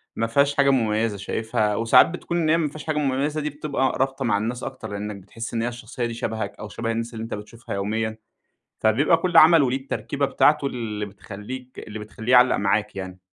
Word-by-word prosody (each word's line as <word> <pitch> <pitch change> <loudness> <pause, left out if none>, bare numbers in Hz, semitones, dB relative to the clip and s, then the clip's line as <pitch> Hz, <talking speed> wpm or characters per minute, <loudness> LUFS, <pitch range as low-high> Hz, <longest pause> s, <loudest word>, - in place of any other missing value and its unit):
ما 115 - 0
فيهاش 140 +4 +2
حاجة 140 -1 +4
مميزة، 110 -4 +1
شايفها 105 +1 -1
وساعات 115 +3 +6
بتكون 175 0 -4
إن 160 -2 +1
هي 165 - +5
ما 160 -3 +1
فيهاش 150 0 -9
حاجة 155 -1 -1
مميزة 145 +2 0
دي 150 - -2
بتبقى 140 -2 -1
رابطة 135 -1 -1
مع 105 -3 +2
الناس 120 +4 -3
أكتر 130 -1 -6
لأنك 105 +1 -4
بتحس 115 +5 -8
إن 115 - 0
هي 120 - 0
الشخصية 120 0 -5
دي 115 - -3
شبهك 110 -3 -3
أو 105 0 -7
شبه 115 -1 -3
الناس 115 +1 -3
اللي 110 0 -5
أنت 115 - -6
بتشوفها 105 +1 -7
يوميًا، 110 +2 -2 0.6
فبيبقى 135 +10 +3
كل 180 +1 +1
عمل 160 0 +8
وليه 130 +1 +1
التركيبة 135 +1 -2
بتاعته 145 0 +3
اللي 110 -5 -4
بتخليك 105 +6 -9
اللي 110 0 -7
بتخليه 110 +3 -5
يعلَّق 125 0 +6
معاك 100 +1 0
يعني. 95 -1 -6
115 Hz, 205 wpm, -24 LUFS, 105-135 Hz, 0.6 s, عمل